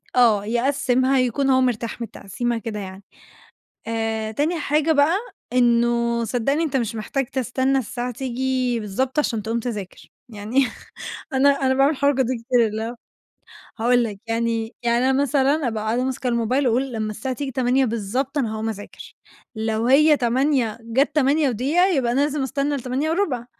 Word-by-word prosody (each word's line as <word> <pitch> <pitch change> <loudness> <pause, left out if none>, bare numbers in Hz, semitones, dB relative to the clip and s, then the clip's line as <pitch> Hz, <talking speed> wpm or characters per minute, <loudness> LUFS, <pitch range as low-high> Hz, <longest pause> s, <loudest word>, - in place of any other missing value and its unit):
آه، 225 -5 +4
يقسِّمها 260 +2 +1
يكون 255 +2 +1
هو 260 -1 +4
مرتاح 240 -2 -1
من 235 - -3
التقسيمة 235 +4 -3
كده 220 -1 -5
يعني. 190 0 -8 0.8
آآ، 225 -1 -2
تاني 310 +9 0
حاجة 300 +2 +2
بقى 300 +4 +3 0.4
إنه 235 -1 +2
صدّقني 250 +7 0
أنت 290 -4 -1
مش 230 -4 -1
محتاج 250 +5 -2
تستنى 260 +2 0
الساعة 245 0 -3
تيجي 255 0 -1
بالضبط 255 +7 -2
عشان 230 -7 0
تقوم 225 +2 -2
تذاكر، 210 -6 -6 0.2
يعني 230 +5 0 0.7
أنا 270 +1 +4
أنا 270 -2 +1
باعمل 270 +2 +4
الحركة 280 -2 +2
دي 255 0 -2
كتير، 245 -2 +3
اللي 215 +1 -4
هو 235 +2 -5 0.8
هاقول 245 +1 +3
لك، 210 -3 -5
يعني 230 0 -1
يعني 240 +2 +2
أنا 265 +1 +2
مثلًا 280 +1 +1
أبقى 220 -2 -3
قاعدة 235 +3 0
ماسكة 260 -1 -2
الموبايل، 245 +3 +1
واقول 255 +3 0
لمّا 215 -2 -2
الساعة 240 +5 -4
تيجي 275 +2 -4
08:00 260 +1 +2
بالضبط 245 +5 -2
أنا 230 -6 -1
هاقوم 220 0 -3
اذاكر، 205 -2 -8 0.4
لو 220 +1 -1
هي 300 +4 +6
08:00 250 -2 +1
جات 250 +7 0
08:01 285 - +2
يبقى 270 -11 +1
أنا 265 - +1
لازم 290 0 0
استنى 275 +2 -1
ل08:15، 275 +1 -1
250 Hz, 160 wpm, -22 LUFS, 230-270 Hz, 0.8 s, هي